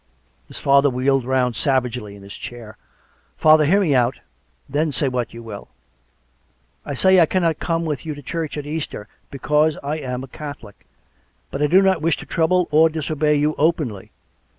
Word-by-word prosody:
His - - -10
father 140 +1 +4
wheeled 130 0 +1
round 125 -2 0
savagely 125 -6 -1
in 100 - -14
his 100 +1 -11
chair. 115 -3 -9 0.3
" - - -39
Father, 155 0 +5
hear 190 +7 +4
me 160 -7 +2
out, 125 0 +2 0.5
and 140 - -12
then 155 +1 +1
say 140 +1 0
what 125 -2 -2
you 115 0 -10
will.... 105 -3 -9 1.2
I 145 - -5
say 190 +6 +5
I 165 - +5
cannot 170 -4 0
come 165 -1 -1
with 150 -3 -3
you 155 -2 -5
to 145 - -11
church 160 +2 -4
at 145 - -5
Easter, 150 -8 -5 0.2
because 150 +2 +1
I 145 +2 -2
am 130 -3 -5
a - - -8
Catholic. 140 -7 -10 0.6
But 140 - -4
I 150 - +3
do 185 +6 +5
not 190 -3 +2
wish 165 0 +1
to - - -9
trouble 180 +1 +1
or 160 +2 +5
disobey 155 -1 0
you 150 +1 +1
openly. 150 - 0
145 Hz, 190 wpm, -21 LUFS, 125-160 Hz, 1.2 s, Father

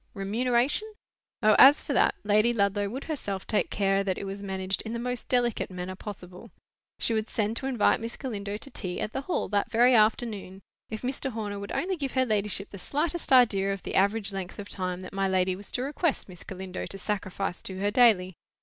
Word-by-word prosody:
"Remuneration?" 245 - 0 0.5
Oh! 215 -1 +6
as 280 +3 +9
for - - -2
that, - - +4
Lady 215 +3 +3
Ludlow 200 -1 +1
would 260 +6 -5
herself 205 - -4
take 215 - 0
care 195 -1 +1
that 190 -2 -1
it - - -5
was 195 0 -5
managed 190 -1 -2
in 220 - -6
the - - -2
most 245 0 -4
delicate 245 -3 +1
manner 185 0 -6
possible. 185 -3 -9 0.5
She 230 - 0
would 220 0 -1
send 215 0 -1
to 265 - -3
invite 245 -5 +3
Miss 230 +1 -6
Galindo 205 -5 -4
to 275 +5 -7
tea 180 -2 -3
at 215 - -3
the 270 - -2
Hall 345 +6 -2
that 205 -1 0
very 245 +2 +5
afternoon, 215 -3 +1 0.3
if 220 +1 -6
Mr. 265 +2 -2
Horner 205 -2 -4
would 200 - -7
only 370 +1 -1
give 275 -4 -3
her 260 -1 +2
ladyship 210 -3 0
the 200 - -8
slightest 300 - -1
idea 210 -7 +5
of 195 -1 -5
the - - -5
average 200 +1 +1
length 190 -2 -5
of 205 0 -8
time 185 -1 -3
that 185 - -9
my 195 0 0
lady 185 -1 +1
was 200 +1 -10
to 250 - -1
request 295 +3 -1
Miss 180 -3 -11
Galindo 190 -1 -6
to 195 - -6
sacrifice 195 -2 -3
to 190 - -6
her 200 +2 0
daily. 205 -6 +4
205 Hz, 215 wpm, -27 LUFS, 195-240 Hz, 0.5 s, as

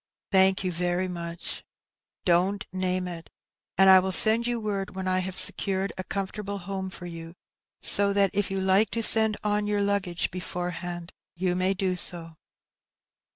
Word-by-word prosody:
"Thank 190 0 +3
you 185 - -2
very 175 +2 -2
much." 170 -1 -7 0.6
"Don't 185 +3 +1
name 185 -1 -2
it; 170 -2 -9 0.5
but 190 +1 +5
I 190 0 +8
will 190 +1 -2
send 220 +5 +6
yon 240 -2 -3
word 200 -2 -4
when 190 0 -5
I 185 0 +1
have 185 0 -4
secured 195 0 -1
a 185 - -6
comfortable 200 +1 -5
home 190 0 -6
for 180 -1 -11
you, 165 -1 -9 0.5
so 200 0 +4
that 200 -2 +2
if 205 -1 -1
you 195 0 -3
like 190 +3 +3
to 230 - +1
send 220 -1 +7
on 210 0 -1
your 205 -1 0
luggage 200 -4 -2
beforehand, 175 -1 -6 0.2
you 180 0 -1
may 185 +2 0
do 185 -1 -1
so." 170 -2 -2
190 Hz, 165 wpm, -26 LUFS, 180-200 Hz, 0.6 s, I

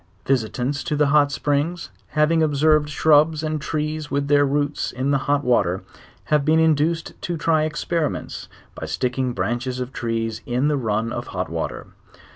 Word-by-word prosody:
Visitants 130 +2 -1
to 155 -3 -1
the 150 0 +3
hot 145 -1 +4
springs, 145 +5 -1 0.3
having 160 +2 +3
observed 150 0 +3
shrubs 155 +1 +3
and 155 -1 -2
trees 155 0 -3
with 140 0 -1
their 145 -1 +4
roots 145 +1 -1
in 130 +3 -1
the 140 - +2
hot 145 0 +2
vvaler, 95 -7 +2 0.4
have 150 -2 +1
been 155 +2 +3
induced 160 +1 +1
to 175 -1 -3
try 155 0 +2
experiments, 155 0 -3 0.2
by - - -7
sticking 125 0 -1
branches 120 +6 -2
of 125 +1 -5
trees 115 -1 -2
in 125 +4 +1
the 150 - +1
run 115 -1 -1
of/ - - -5
hot - - -4
water. - - -4
145 Hz, 165 wpm, -22 LUFS, 125-155 Hz, 0.4 s, hot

